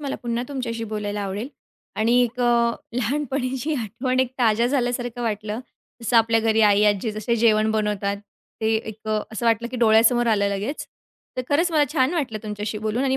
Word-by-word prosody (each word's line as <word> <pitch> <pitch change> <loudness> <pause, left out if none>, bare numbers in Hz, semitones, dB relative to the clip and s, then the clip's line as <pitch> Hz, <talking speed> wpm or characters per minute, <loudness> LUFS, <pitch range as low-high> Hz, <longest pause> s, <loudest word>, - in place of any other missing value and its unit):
मला 280 -2 -3
पुन्हा 235 0 -1
तुमच्याशी 235 -5 -4
बोलायला 210 -1 -3
आवडेल 200 +6 -4 0.5
आणि 235 +3 +3
एक 245 +1 -2
अ, 235 -1 +3 0.2
लहानपणीची 265 +3 -1
आठवण 255 +2 -1
एक 260 - 0
ताज्या 230 -1 +3
झाल्यासारखं 245 -2 -1
वाटलं. 215 0 -3 0.4
जसं 230 +1 +1
आपल्या 225 0 +4
घरी 225 0 +2
आई, 205 0 +5
आजी 210 +2 +2
जसे 215 +3 -1
जेवण 220 -1 +3
बनवतात, 210 -2 -1 0.4
ते 220 0 +2
एक 220 -1 -7
अ, 215 0 +1
असं 230 +2 -2
वाटलं, 230 +1 +2
की 255 - -6
डोळ्यासमोर 235 +1 +4
आलं 205 -3 +2
लगेच. 200 +9 -3 0.5
तर 255 - -1
खरंच 330 +5 +2
मला 300 -2 +4
छान 275 +1 +2
वाटलं 260 -10 -2
तुमच्याशी 210 0 -4
बोलून 220 +4 -1
आणि 265 -1 +1
230 Hz, 180 wpm, -23 LUFS, 215-250 Hz, 0.5 s, आई